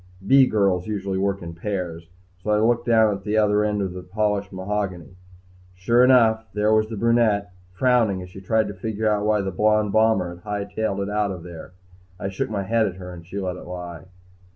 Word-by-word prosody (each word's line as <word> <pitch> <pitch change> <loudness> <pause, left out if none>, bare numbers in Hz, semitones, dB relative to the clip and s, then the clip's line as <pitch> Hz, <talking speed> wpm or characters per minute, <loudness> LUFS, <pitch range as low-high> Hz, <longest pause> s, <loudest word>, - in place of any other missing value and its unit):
B 135 +4 +6
girls 100 -5 +1
usually 100 -3 -2
work 100 -1 -1
in 85 0 -7
pairs, 85 -2 -5 0.3
so 105 - -5
I 105 - +3
looked 120 +2 +1
down 110 -2 +4
toward 100 -1 -5
the 105 +1 -1
other 105 -1 +3
end 105 -1 0
of 95 -2 -4
the 90 - -7
polished 100 +1 -1
mahogany. 95 -2 -4 0.6
Sure 115 +7 +3
enough, 115 -3 +4
there 105 +1 +2
was 110 0 +2
the 110 - -5
brunette, 110 -3 +2 0.2
frowning 115 -2 +2
as 90 - -11
she 95 - -10
tried 110 +2 +1
to - - -5
figure 105 +1 -1
why 105 -1 +2
the 95 0 -3
blond 105 +1 +2
bomber 110 -4 +2
had 85 0 -15
high 105 -1 -3
tailed 100 -1 -3
it 100 - -3
out 105 -1 0
of 90 -3 -6
there. 85 0 -10 0.5
I 95 - -3
shook 95 - -3
my 100 -2 -2
head 110 +2 +1
at 95 - -5
her 90 -1 -9
and 85 -1 -10
she 95 +4 -6
let 90 -2 -3
it - - -11
lie. 90 -3 -7
100 Hz, 215 wpm, -23 LUFS, 95-110 Hz, 0.6 s, B